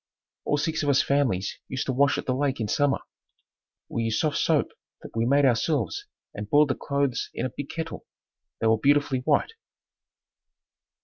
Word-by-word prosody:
All 145 - +1
six 160 +2 -1
of 145 - 0
us 140 - +4
families 125 -9 0
used 130 0 -3
to 130 - -1
wash 140 +2 +3
at - - -4
the 130 - 0
lake 135 0 0
in 110 - -1
summer. 145 +5 +1 0.9
We 115 - -3
used 110 -1 0
soft 155 -2 0
soap - - +2 0.3
that - - -11
we 115 +1 +1
made 140 +2 +4
ourselves 125 - 0 0.3
and 105 0 -6
boiled 145 +2 +5
the - - +2
clothes 140 -3 -1
in 120 - -2
a 130 - -3
big 145 - -5
kettle. 165 0 -6 0.5
They - - -1
were 110 -1 +4
beautifully 145 0 +3
white. 145 - +1
140 Hz, 180 wpm, -26 LUFS, 120-145 Hz, 0.9 s, boiled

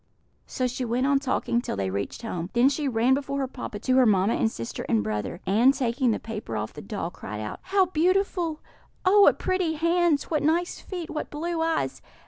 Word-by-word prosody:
So 255 - -2
she 250 +1 -2
went 245 +2 0
on 280 0 +3
talking 255 -3 0
till - - -4
they 95 -1 -2
reached 100 - -4
home; 180 -6 -4
then 245 +3 +5
she 285 +1 -2
ran 245 +1 +3
before 280 0 -1
her 270 -1 -1
papa 250 -5 -7
to 255 +5 +1
her 260 - +6
mamma 200 +1 +3
and 225 - +1
sister 115 - -5
and 110 -2 +2
brother, 105 - -3
and, 235 +8 +4
taking 255 -1 0
the 220 - +1
paper 215 - -5
off 105 0 -4
the 150 - -8
doll, 195 -5 -4
cried 105 - -7
out: 105 0 -5
"How 385 0 +3
beautiful! 355 -1 0 0.4
Oh, 405 +3 +6
what - - +6
pretty 370 -3 0
hands! 335 -1 +2
What 305 -3 -1
nice 335 +4 +1
feet! 355 -4 -6
What 305 - -4
blue 330 +2 -3
eyes! 325 0 -1
260 Hz, 210 wpm, -26 LUFS, 210-325 Hz, 0.4 s, her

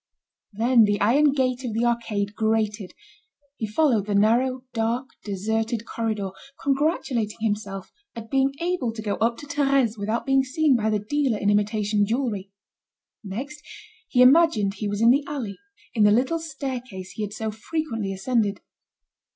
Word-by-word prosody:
Then 230 +2 +4
the 205 0 0
iron 280 +8 +4
gate 260 -2 0
of 240 -4 -3
the 230 +2 +1
arcade 215 -4 -1
grated, 215 -2 -1 0.6
he 220 - -3
followed 225 -3 +2
the 205 - 0
narrow, 245 +5 +2
dark, 235 +3 -1
deserted 220 +3 -2
corridor, 215 -5 -3 0.3
congratulating 270 -6 0
himself 205 -3 -3 0.2
at 225 -1 -9
being 270 0 +2
able 340 -8 -1
to 220 - -6
go 205 -2 -1
up 230 +1 +1
to - - -9
Thérèse 275 -6 +1
without 215 +3 -2
being 270 0 +3
seen 285 +1 +2
by 220 -2 +1
the 215 - +2
dealer 245 +3 0
in 205 0 +1
imitation 210 0 +1
jewelry. 220 -5 -2 0.7
Next 265 +10 -6 0.5
he 250 -1 +4
imagined 255 -8 +5
he 205 +1 -4
was 205 +1 -2
in 230 +1 +7
the 280 +3 +3
alley, 255 -9 -5 0.3
in 225 - 0
the 210 - +7
little 260 +10 +2
staircase 255 - -6
he 215 - -7
had 205 -1 -3
so 220 0 -3
frequently 225 -3 -3
ascended. 205 0 0
225 Hz, 160 wpm, -24 LUFS, 210-265 Hz, 0.7 s, in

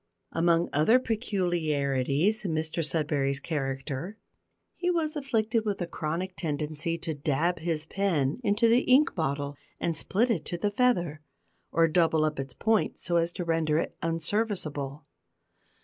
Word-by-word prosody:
Among 170 0 +2
other 155 - +5
peculiarities 175 - 0
in 180 -5 -1
Mr 160 +1 -1
Sudberry's 145 -3 0
character, 140 +5 -3 0.6
he 360 - -1
was 325 -3 0
afflicted 230 -5 0
with 205 -2 -2
a 175 - -1
chronic 170 +3 -3
tendency 155 +1 -2
to 165 -1 -4
dab 155 +4 0
his 160 -1 -2
pen 165 - 0
into 210 +3 +3
the 230 +2 +5
ink 270 +4 +4
bottle 140 -3 -2 0.2
and 165 - -1
split 225 +9 +1
it 170 -9 0
to 175 - -3
the 205 +3 0
feather, 175 -10 +1 0.5
or 165 0 +4
double 160 -1 +3
up 155 -2 -2
its 135 -2 -5
point 220 -2 +1
so 170 -1 0
as 170 0 +1
to 175 - -4
render 160 -2 +1
it - - -2
unserviceable. 165 -5 -1
165 Hz, 150 wpm, -28 LUFS, 150-205 Hz, 0.6 s, other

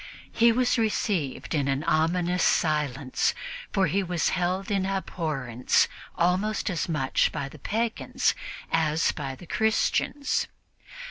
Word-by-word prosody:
He 235 0 +5
was 250 +1 +2
received 200 - -1
in 145 -3 +1
an 135 +2 0
ominous 175 +3 +1
silence, 145 -5 +1 0.4
for 195 - +2
he 200 +2 +1
was 175 -3 0
held 185 +2 -1
in 195 -2 +1
abhorrence 155 -10 0 0.3
almost 190 +5 +1
as 175 -1 -2
much 140 -5 +1
by 145 -3 -3
the 150 +2 -12
pagans 225 - 0 0.4
as 160 0 +2
by 135 -3 -5
the 175 - -13
Christians. 220 - +1
175 Hz, 125 wpm, -26 LUFS, 150-195 Hz, 0.4 s, He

